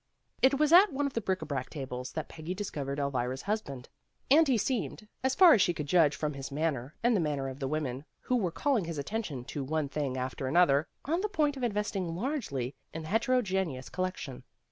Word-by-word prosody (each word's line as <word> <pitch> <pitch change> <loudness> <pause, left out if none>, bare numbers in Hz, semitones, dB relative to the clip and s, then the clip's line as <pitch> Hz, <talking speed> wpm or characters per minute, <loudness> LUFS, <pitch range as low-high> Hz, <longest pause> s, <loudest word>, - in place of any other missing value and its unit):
It 265 +1 +5
was 305 +2 +3
at 370 +2 +8
one 285 +1 -1
of 280 - -2
the 230 - -1
bric 190 -4 -1
a - - -5
brac 135 -4 -3
tables 130 -3 -6
that 155 - -3
Peggy 165 +3 -6
discovered 145 -9 -4
Elvira's 130 -2 -1
husband, 145 - -3 0.4
and 315 +2 +7
he 260 -3 +3
seemed, 220 -1 -2 0.2
as 265 0 +1
far 355 -4 +8
as 215 - +4
she 175 -3 +2
could 150 - -3
judge 150 -2 +4
from 150 -1 -2
his 135 0 -7
manner 145 -3 -2
and 240 0 +4
the - - +3
manner 145 -4 -1
of 135 +1 -7
the 135 - -2
women 140 -2 -3 0.2
who 255 - 0
were 200 -8 +1
calling 235 - 0
his 165 -2 -5
attention 145 - -4
to 140 +1 -4
one 150 +1 -1
thing 140 -3 -2
after 130 +1 -3
another, 155 0 +4 0.2
on 330 +5 0
the 425 - -1
point 300 -7 +1
of 265 - -7
investing 205 -6 -1
largely 175 - -2 0.2
in 160 - -6
the 155 - -7
heterogeneous 190 - 0
collection. 185 -8 -4
165 Hz, 215 wpm, -30 LUFS, 140-230 Hz, 0.4 s, at